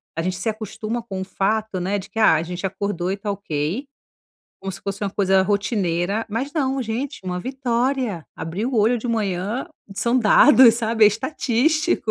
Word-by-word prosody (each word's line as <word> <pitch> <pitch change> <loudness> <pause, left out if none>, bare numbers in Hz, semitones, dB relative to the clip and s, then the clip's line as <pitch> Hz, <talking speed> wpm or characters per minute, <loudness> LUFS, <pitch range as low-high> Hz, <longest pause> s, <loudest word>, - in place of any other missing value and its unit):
a 165 - -1
gente 185 +1 -2
se 190 - -4
acostuma 220 +1 -3
com 195 -5 -6
o - - -2
fato, 205 +1 -1
né, 195 +3 -1
de 190 - -7
que: 225 - -5
"Ah, 215 -7 +6
a 160 - 0
gente 180 +2 -5
acordou 190 -1 -3
e 195 - -2
tá 205 0 -3
ok." 185 - -3 0.7
Como 195 0 -5
se 195 - -8
fosse 200 +1 -4
uma 195 - -2
coisa 190 -1 +3
rotineira, 200 0 0
mas 240 +7 -3
não. 270 -4 0
Gente, 240 +5 -4
uma 180 -1 -3
vitória, 250 - -1
abrir 175 +7 -4
o 260 - -3
olho 230 +2 +3
de 235 - -6
manhã, 210 - -1 0.3
são 235 +5 +1
dados, 245 +2 +7
sabe, 225 -1 +2
é - - +9
estatístico. 290 - +1
210 Hz, 190 wpm, -22 LUFS, 190-240 Hz, 0.7 s, é